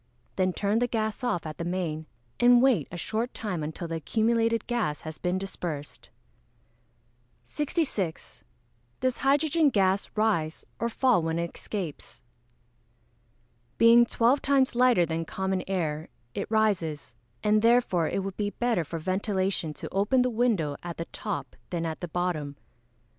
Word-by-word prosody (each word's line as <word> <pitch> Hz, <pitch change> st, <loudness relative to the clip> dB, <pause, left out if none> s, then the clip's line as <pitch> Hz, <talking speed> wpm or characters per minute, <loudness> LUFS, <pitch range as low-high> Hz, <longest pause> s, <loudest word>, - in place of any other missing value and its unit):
Then 185 Hz, -1 st, +2 dB
turn 205 Hz, +4 st, 0 dB
the 245 Hz, -, +2 dB
gas 220 Hz, +1 st, -2 dB
off 220 Hz, -10 st, -1 dB
at 155 Hz, -1 st, -7 dB
the -, -, -2 dB
main, 170 Hz, -3 st, -3 dB, 0.3 s
and 245 Hz, 0 st, +7 dB
wait 240 Hz, -, +3 dB
a 175 Hz, -, -6 dB
short 225 Hz, +7 st, -2 dB
time 195 Hz, -7 st, -3 dB
until 160 Hz, +3 st, -5 dB
the 165 Hz, 0 st, -3 dB
accumulated 230 Hz, +5 st, +1 dB
gas 220 Hz, -, -1 dB
has 155 Hz, 0 st, -8 dB
been 180 Hz, +1 st, 0 dB
dispersed. 155 Hz, -10 st, -6 dB, 1.3 s
66. 260 Hz, -, -3 dB, 0.6 s
Does 255 Hz, -1 st, 0 dB
hydrogen 290 Hz, +3 st, +3 dB
gas 195 Hz, -4 st, +2 dB
rise 185 Hz, -8 st, 0 dB
or 235 Hz, -, 0 dB
fall 245 Hz, -4 st, +3 dB
when 165 Hz, 0 st, -1 dB
it 170 Hz, 0 st, -3 dB
escapes? 185 Hz, -8 st, -6 dB, 1.5 s
Being 235 Hz, +1 st, +7 dB
twelve 240 Hz, +5 st, +3 dB
times 275 Hz, -2 st, +3 dB
lighter 245 Hz, -7 st, +4 dB
than 165 Hz, 0 st, -2 dB
common 190 Hz, +1 st, -2 dB
air 160 Hz, -5 st, -2 dB, 0.2 s
it -, -, -4 dB
rises, 175 Hz, -, 0 dB, 0.3 s
and 215 Hz, 0 st, +4 dB
therefore 230 Hz, -8 st, +3 dB
it 195 Hz, -, -1 dB
would 195 Hz, -1 st, -5 dB
be 205 Hz, -1 st, 0 dB
better 230 Hz, -4 st, 0 dB
for 165 Hz, +2 st, -5 dB
ventilation 185 Hz, -1 st, -1 dB
to -, -, -8 dB
open 205 Hz, +7 st, +3 dB
the 250 Hz, -, 0 dB
window 215 Hz, -11 st, +1 dB
at 175 Hz, -1 st, -6 dB
the 165 Hz, -, -3 dB
top 210 Hz, -4 st, -4 dB
than 170 Hz, -2 st, -2 dB
at 160 Hz, -1 st, -4 dB
the 175 Hz, -, -3 dB
bottom. 160 Hz, -4 st, -2 dB
195 Hz, 150 wpm, -27 LUFS, 165-235 Hz, 1.5 s, and